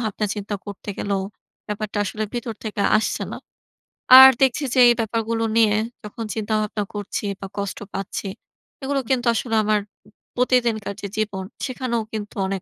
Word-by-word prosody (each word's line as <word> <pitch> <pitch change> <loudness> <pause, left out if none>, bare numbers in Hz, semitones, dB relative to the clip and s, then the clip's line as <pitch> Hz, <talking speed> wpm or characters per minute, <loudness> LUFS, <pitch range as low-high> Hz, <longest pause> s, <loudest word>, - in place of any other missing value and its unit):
ভাবনা-চিন্তা 210 -2 -3
করতে 200 +1 -9
গেলেও 200 -1 -1 0.4
ব্যাপারটা 210 0 -4
আসলে 215 +2 -3
ভিতর 235 -2 -3
থেকে 210 -2 -2 0.2
আসছে - - -2
না। - - -5 0.8
আর 265 0 +12
দেখছি 265 +2 +3
যে 255 - +2
এই 240 - +7
ব্যাপারগুলো 225 +1 -1
নিয়ে 215 -2 +5 0.3
যখন 210 +2 -7
চিন্তা-ভাবনা 215 -1 -1
করছি 205 +1 -4
বা 195 - -6
কষ্ট 200 -1 -3 0.2
পাচ্ছি 195 +1 -4 0.6
এগুলো 275 0 0
কিন্তু 255 -2 +1
আসলে 225 0 -1
আমার 215 0 +2 0.6
প্রতিদিনকার 235 -5 +1
যে 200 - -4
জীবন, 205 -3 -2 0.2
সেখানেও 250 -3 -2
কিন্তু 210 -1 -5
অনেক 195 -1 -3
215 Hz, 150 wpm, -22 LUFS, 205-235 Hz, 0.8 s, আর